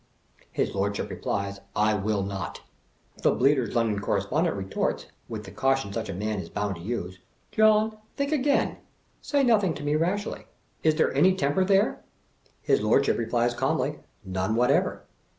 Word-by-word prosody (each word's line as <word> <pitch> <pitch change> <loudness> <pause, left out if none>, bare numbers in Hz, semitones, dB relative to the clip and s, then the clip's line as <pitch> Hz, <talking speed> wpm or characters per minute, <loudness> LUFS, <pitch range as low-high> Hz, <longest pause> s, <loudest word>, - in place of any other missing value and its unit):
His - - -1
Lordship 100 +1 -1
replies, 100 0 -3 0.2
"I 105 0 +3
will 105 0 0
not." 100 -1 -5 0.6
The - - +4
Bleat&r's 135 -2 +2
London 115 -3 +1
Correspondent 105 - 0
retorts, 95 -1 -2 0.2
with - - -5
the - - -10
caution 135 -6 0
such 115 +1 -3
a - - -3
man 105 +2 -2
is - - -7
bound 105 -2 -2
to - - -11
use, 90 -3 -4 0.2
" - - -40
John, 215 0 +4 0.2
think 280 +1 -1
again; 285 -1 +1 0.4
say 285 -2 +1
nothing 205 - +3
to 145 - -7
me 145 +1 +1
rashly; 185 +7 -1 0.3
is 155 -1 +3
there - - +2
any 180 +7 +4
temper 155 +3 +1
here?" 195 +1 +2 0.6
His - - +3
Lordship 115 +7 +3
replies 120 +1 +1
calmly, 120 - -1 0.3
"None 95 +3 -1
whatever." 125 +1 +2
120 Hz, 160 wpm, -26 LUFS, -, 0.6 s, The